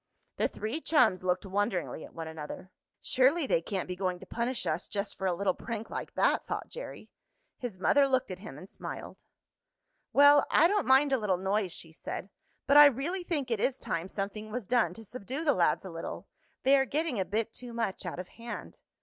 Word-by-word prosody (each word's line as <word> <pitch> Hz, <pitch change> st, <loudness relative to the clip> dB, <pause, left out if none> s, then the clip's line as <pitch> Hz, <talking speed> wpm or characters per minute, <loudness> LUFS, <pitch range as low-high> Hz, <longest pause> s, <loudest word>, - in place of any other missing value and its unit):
The -, -, +2 dB
three 225 Hz, +9 st, -4 dB
chums 230 Hz, -, +3 dB
looked 185 Hz, +2 st, 0 dB
wonderingly 195 Hz, -4 st, -1 dB
at -, -, -13 dB
one 165 Hz, -1 st, -5 dB
another. 160 Hz, +4 st, -8 dB, 0.3 s
"Surely 275 Hz, +5 st, +3 dB
they 165 Hz, -, +2 dB
can't 190 Hz, +2 st, -3 dB
be 180 Hz, -, -4 dB
going 185 Hz, -1 st, -1 dB
to -, -, -11 dB
punish 240 Hz, +1 st, -2 dB
us 155 Hz, +3 st, -1 dB
just 200 Hz, 0 st, -3 dB
for 190 Hz, -, -2 dB
a 180 Hz, -, +2 dB
little 190 Hz, +1 st, +1 dB
prank 225 Hz, +2 st, -6 dB
like -, -, -5 dB
that," -, -, +2 dB
thought -, -, -4 dB
Jerry. -, -, -8 dB, 0.5 s
His 240 Hz, -7 st, -5 dB
mother 275 Hz, +9 st, +4 dB
looked 260 Hz, -5 st, +1 dB
at 185 Hz, -, -6 dB
him 185 Hz, -8 st, -9 dB
and 185 Hz, -, -10 dB
smiled. -, -, -8 dB, 0.9 s
"Well, 285 Hz, 0 st, +7 dB
I 330 Hz, -, +6 dB
don't 410 Hz, +2 st, +1 dB
mind 270 Hz, +2 st, +5 dB
a 265 Hz, -, +3 dB
little 200 Hz, -4 st, +1 dB
noise," 195 Hz, 0 st, 0 dB
she 165 Hz, -1 st, -6 dB
said. 185 Hz, +4 st, -6 dB, 0.3 s
"But 280 Hz, +1 st, +5 dB
I 295 Hz, 0 st, +12 dB
really 295 Hz, +8 st, -1 dB
think 290 Hz, -8 st, -2 dB
it 225 Hz, -, +1 dB
is 265 Hz, +4 st, +1 dB
time 170 Hz, +2 st, -3 dB
something 205 Hz, +2 st, -4 dB
was 230 Hz, 0 st, -4 dB
done 245 Hz, +2 st, +2 dB
to 225 Hz, -, -11 dB
subdue 255 Hz, +8 st, -5 dB
the 290 Hz, -, +5 dB
lads 180 Hz, -1 st, +2 dB
a 190 Hz, -, -6 dB
little. 165 Hz, 0 st, -6 dB, 0.4 s
They 270 Hz, +2 st, +6 dB
are 270 Hz, -, +3 dB
getting 295 Hz, -4 st, -1 dB
a -, -, +2 dB
bit 215 Hz, +5 st, -2 dB
too 245 Hz, -1 st, -8 dB
much 230 Hz, -5 st, -2 dB
out 180 Hz, -2 st, -5 dB
of 180 Hz, 0 st, -6 dB
hand." 235 Hz, +1 st, -8 dB
220 Hz, 210 wpm, -30 LUFS, 185-270 Hz, 0.9 s, I